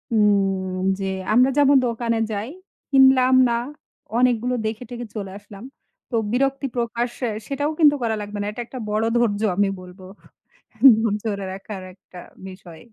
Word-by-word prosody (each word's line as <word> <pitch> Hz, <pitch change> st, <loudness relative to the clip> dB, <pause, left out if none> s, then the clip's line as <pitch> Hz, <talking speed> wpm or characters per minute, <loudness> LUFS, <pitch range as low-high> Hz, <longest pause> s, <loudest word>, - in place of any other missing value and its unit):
উম 195 Hz, -3 st, +1 dB, 0.2 s
যে 195 Hz, 0 st, -2 dB, 0.2 s
আমরা 255 Hz, +3 st, +5 dB
যেমন 285 Hz, -1 st, +5 dB
দোকানে 230 Hz, 0 st, -1 dB
যাই, 210 Hz, +5 st, -4 dB, 0.4 s
কিনলাম 265 Hz, -1 st, +5 dB
না, 235 Hz, -, +1 dB, 0.6 s
অনেকগুলো 250 Hz, 0 st, +2 dB
দেখে-টেখে 235 Hz, +1 st, -6 dB
চলে 195 Hz, -3 st, -5 dB
আসলাম। 205 Hz, +1 st, -13 dB, 0.5 s
তো -, -, -1 dB, 0.2 s
বিরক্তি 275 Hz, +2 st, 0 dB
প্রকাশ্য 235 Hz, +1 st, -2 dB, 0.3 s
সেটাও 285 Hz, +2 st, -2 dB
কিন্তু 295 Hz, -2 st, +6 dB
করা 220 Hz, -1 st, 0 dB
লাগবে 205 Hz, 0 st, -7 dB
না। 205 Hz, -, -3 dB
এটা 240 Hz, -, -6 dB
একটা 255 Hz, -, -8 dB
বড় 215 Hz, +1 st, 0 dB
ধৈর্য 215 Hz, -3 st, +1 dB, 0.2 s
আমি 200 Hz, -1 st, +3 dB
বলবো। 180 Hz, +1 st, -13 dB, 1.0 s
ধৈর্য -, -, 0 dB, 0.2 s
ধরে 200 Hz, -3 st, -2 dB
রাখার 195 Hz, 0 st, -8 dB
একটা 180 Hz, -1 st, -15 dB, 0.3 s
বিষয়। 175 Hz, -3 st, -13 dB
225 Hz, 145 wpm, -22 LUFS, 200-250 Hz, 1.0 s, কিন্তু